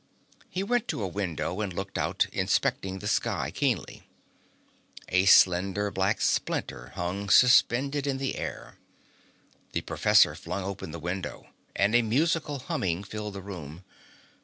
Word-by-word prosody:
He 185 - -3
went 240 +2 0
to 110 - -3
a - - -1
window 90 0 -3
and 100 -3 -2
looked 95 +2 -6
out, - - +1
inspecting 95 0 0
the 105 - -6
sky - - 0
keenly. - - -2 1.0
A 90 +1 +3
slender 95 +2 +4
black 95 +3 0
splinter - - -1
hung 95 +4 -3
suspended 135 +5 +4
in 135 -1 0
the 135 0 -2
air. - - -7 0.9
The - - -1
professor - - +4
flung 90 +3 -5
open 95 -3 -5
the 85 - -6
window, 90 +3 -5 0.3
and 100 +3 +2
a 120 - +6
musical 145 +6 0
humming 95 -8 -2
filled 105 0 -6
the 95 - -7
room. 85 -4 -8
100 Hz, 140 wpm, -27 LUFS, 95-120 Hz, 1.0 s, a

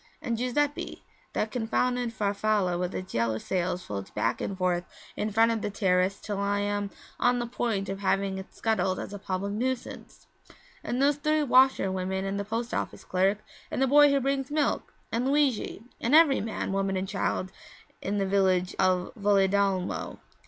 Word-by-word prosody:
And 235 - -2
Giuseppe 275 +5 -1 0.3
that 215 - -1
confounded 245 +1 0
Farfalla 205 -3 0
with 180 +1 -2
its 185 0 -6
yellow 115 -1 +1
sails 180 +5 -2
floats 100 -1 -5
back - - -1
and 195 - -3
forth 180 -1 +1 0.3
in 210 - -1
front 225 +2 +4
of 225 -2 -1
the 210 - -2
terrace 190 -1 +1
till 205 -1 -4
I 200 0 +1
am 205 0 -1 0.3
on 245 0 +3
the 240 - -1
point 225 -4 -2
of 195 +1 -4
having 195 -1 0
it 190 - -10
scuttled 190 -4 0
as - - -6
a 205 - -6
public 195 0 -3
nuisance; 255 +3 -4 0.6
and 245 - -2
those 280 +1 +3
three 305 +1 +1
washer 260 -7 +4
women 190 +1 -2
and 195 +1 -2
the - - -1
post 230 +3 -3
office - - -3
clerk 195 +3 +1 0.3
and - - -3
the 270 - +4
boy 290 +2 +7
who 280 0 +3
brings 270 0 -1
milk, 295 -1 0 0.2
and 235 +3 0
Luigi 275 -6 +1 0.2
and 245 +6 +3
every 315 -4 +6
man, 220 -2 -3
woman 195 -1 0
and 190 +1 -2
child 190 -1 -2 0.5
in 200 +2 -2
the 195 - +1
village 190 -2 +2
of 185 -1 +2
Valedolmo!' 200 -2 +1
205 Hz, 180 wpm, -28 LUFS, 190-245 Hz, 0.6 s, boy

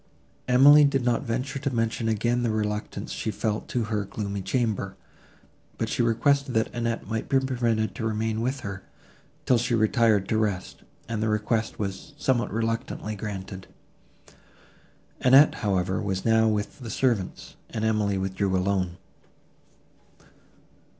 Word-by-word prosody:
Emily 140 +4 +7
did 135 -3 +2
not 120 -2 +2
venture 130 +4 -3
to 140 +1 -1
mention 115 -1 -1
again 120 +3 +1
the 120 - 0
reluctance 105 -1 -3
she - - -3
felt 105 0 -2
to 120 - -1
her 105 -1 -1
gloomy 100 0 -4
chamber, 105 -4 -1 0.8
but - - -2
she - - 0
requested 130 +3 +2
that 110 - +1
Annette 115 -1 -2
might 110 +1 -3
be 135 - +4
permitted 120 -4 0
to 115 -4 -3
remain 110 0 -1
with 130 +3 -2
her 95 -3 -6 0.6
till 125 -2 +4
she 120 0 0
retired 110 -3 +3
to 110 - +2
rest; 100 -4 -2 0.3
and 115 -1 -3
the 110 - +1
request 110 +1 -1
was 100 +8 -5
somewhat 130 -4 0
reluctantly 115 0 -2
granted. 95 -2 -6 1.5
Annette, 135 +4 +6
however, 95 -2 0
was 95 -2 -3
now 110 0 +4
with 105 +2 -2
the 120 -3 -7
servants, 110 -4 -1
and 110 -1 -3
Emily 105 -3 +1
withdrew 95 0 0
alone. 90 -2 -1
110 Hz, 145 wpm, -26 LUFS, 105-120 Hz, 1.5 s, Emily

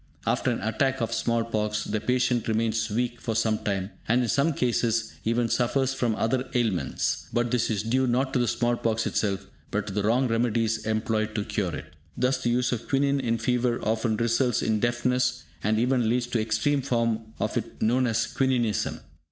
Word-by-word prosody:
After - - +1
an - - -1
attack 130 +6 0
of 115 - -1
small 115 -1 +1
pox, 105 -2 -1
the 105 0 -2
patient 125 -1 +1
remains 110 0 0
weak 120 +2 -2
for 115 - -2
sometime, 105 -3 0 0.2
and 125 +3 +3
in 120 - -1
some 140 +7 +2
cases 115 -3 0
even 115 +1 +2
suffers 130 +3 +1
from 120 -4 0
other 125 +4 0
ailments. 110 -7 0
But 120 0 0
this 125 -3 +1
is 105 -3 -1
due 130 +3 +1
not 130 +2 +1
to 130 - +2
the 120 - +1
small 120 +1 +1
pox 115 -1 0
itself; 100 -2 -1 0.2
but 105 0 -1
to 100 - -6
the 105 - 0
wrong 120 +5 +2
remedies 115 -1 0
employed 110 0 0
to 105 -2 -1
cure 90 -6 -2
it. - - -9 0.2
Thus, 130 +1 +1
the 120 - 0
use 120 0 +1
of 120 -3 -3
quinine 140 0 +2
in 115 -3 0
fever 120 +1 0
often 110 0 0
results 120 +2 +1
in 110 -1 +1
deafness, 125 +2 +1 0.2
and 110 +1 +2
even 120 -1 +2
leads 120 +1 +1
to 120 -1 -1
the - - +1
extreme 135 +6 +1
form 115 -3 -1
of - - -1
it - - -4
known 125 +3 +2
as 115 0 +1
"quininism". 125 -5 0
115 Hz, 195 wpm, -26 LUFS, 110-125 Hz, 0.2 s, and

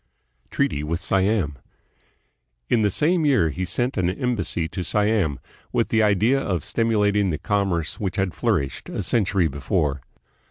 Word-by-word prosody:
Treaty 70 - 0
with 80 +3 -2
Slam. 95 - 0 1.1
In 115 - +3
the 105 - +3
same 160 - +2
year 130 - +3
he 95 +5 -3
sent 120 +6 -1
an 90 -2 +2
em 125 +5 -1
bassy 85 -4 -2
to 90 - -4
Siam, 105 - +1 0.3
with - - 0
the 110 - +3
idea 110 +6 +3
of 90 -7 -2
stimulating 105 -3 +1
the 80 - -1
commerce 95 -6 -1
which 95 -2 -2
had 95 -4 -1
flourished 70 -1 -1
a - - -3
century 100 -6 +1
before. 70 -1 -1
95 Hz, 155 wpm, -23 LUFS, 85-110 Hz, 1.1 s, In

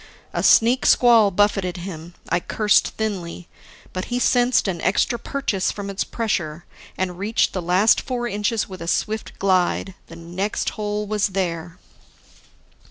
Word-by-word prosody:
A - - -1
sneak 240 +3 +4
squall 230 -4 +6
buffeted 195 -2 +1
him. 175 -1 -8
I 175 - +1
cursed 210 +3 +2
thinly. 185 -5 -4 0.5
But 185 - -3
he 245 - -2
sensed 245 -1 +2
an 175 -3 -3
extra 235 +4 +1
purchase 220 -7 -1
from 200 -1 -6
its 195 - -2
pressure, 175 -8 -3 0.3
and 180 -1 -3
reached 215 +3 +1
the 185 - -2
last 185 +5 +3
four 245 -2 -3
inches 210 +1 -1
with 185 -2 -10
a 165 - -6
swift 215 +5 -2
glide. 190 0 +1
The 165 - -11
next 175 +5 -3
hole 210 0 -3
was 210 0 0
there. 170 -2 -3
195 Hz, 150 wpm, -22 LUFS, 180-220 Hz, 0.5 s, squall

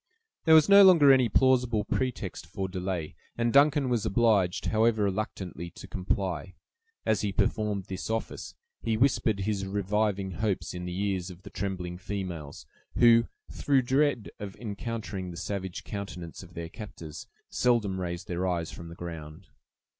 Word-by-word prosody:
There 160 -1 +7
was 155 - +7
no 200 0 +9
longer 165 -8 +8
any 130 -3 +3
plausible 125 -3 +3
pretext 110 -12 -3
for 95 +3 -4
delay; 90 -3 -3 0.2
and 115 0 +1
Duncan 140 0 +5
was 120 -4 0
obliged, 100 -4 +2
however 110 -1 +2
reluctantly, 95 -4 -3
to - - -10
comply. 95 -3 -2 0.5
As 110 -3 +2
he 105 - -1
performed 105 0 0
this 95 +1 -5
office, 115 0 -4 0.3
he 110 -1 0
whispered 115 -5 +2
his 100 0 -1
reviving 100 0 0
hopes 100 +2 -2
in 90 0 -5
the 90 +1 -4
ears 95 -2 -2
of 90 0 -12
the - - -11
trembling 90 -2 -4
females, 90 -7 -6 0.3
who, 115 -1 +6 0.2
through 135 -3 +2
dread 130 -3 +1
of 100 -2 -6
encountering 105 -4 -5
the 85 - -8
savage 95 -1 -4
countenances 90 -5 -7
of 90 -2 -14
their 85 0 -5
captors, 85 -7 -9 0.2
seldom 105 -7 +1
raised 85 0 -4
their 90 +1 -1
eyes 85 -3 -1
from 85 - -9
the 85 - -10
ground. 85 0 -8
100 Hz, 155 wpm, -28 LUFS, 90-115 Hz, 0.5 s, no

